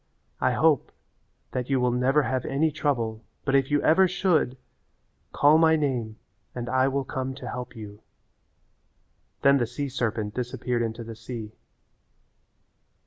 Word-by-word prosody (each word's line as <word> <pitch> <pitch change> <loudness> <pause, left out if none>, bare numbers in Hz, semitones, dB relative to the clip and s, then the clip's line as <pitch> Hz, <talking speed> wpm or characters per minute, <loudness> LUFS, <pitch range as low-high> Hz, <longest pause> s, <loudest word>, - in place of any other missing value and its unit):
I - - +2
hope - - +2 0.6
that 125 0 -3
you 135 -1 +2
will 125 0 +2
never 130 +4 +2
have 130 -1 -1
any 155 +3 +1
trouble, 115 -7 -1 0.2
but 135 - 0
if 135 -1 +3
you 145 0 +1
ever 185 +4 +5
should, 175 -8 +1 0.7
call 150 +2 +5
my 160 -1 +5
name 125 -8 -2 0.4
and 120 -1 -4
I 130 +1 +2
will 135 0 0
come 130 0 -4
to - - -8
help 125 0 -6
you." 105 -2 -10 1.4
Then 140 0 +6
the 120 - 0
sea 135 +4 -4
serpent 110 -5 -2
disappeared 125 0 -2
into 115 0 -3
the 115 0 -8
sea. 110 -1 -7
130 Hz, 145 wpm, -26 LUFS, 120-140 Hz, 1.4 s, Then